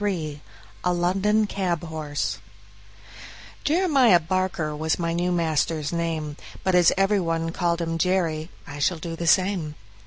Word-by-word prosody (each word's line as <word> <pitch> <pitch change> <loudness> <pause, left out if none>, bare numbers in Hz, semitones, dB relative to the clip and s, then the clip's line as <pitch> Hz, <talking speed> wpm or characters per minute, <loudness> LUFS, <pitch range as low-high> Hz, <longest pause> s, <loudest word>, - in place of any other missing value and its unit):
33 160 -8 -2 0.4
A 180 - +2
London 195 +5 +2
Cab 180 -5 -2
Horse 155 -3 -3 1.2
Jeremiah 285 - +4
Barker 170 -2 -1
was 155 +1 0
my 170 -1 -1
new 175 +1 0
master's 160 -2 0
name, 160 -3 -2 0.3
but 190 - +1
as 175 -2 +6
every 195 +1 +3
one 165 -2 -1
called 170 -1 0
him 165 0 -2
Jerry, 165 -3 0 0.2
I 145 -3 -8
shall 170 +4 +1
do 165 +1 -5
the 170 0 -4
same. 180 -4 +2
170 Hz, 145 wpm, -24 LUFS, 160-185 Hz, 1.2 s, as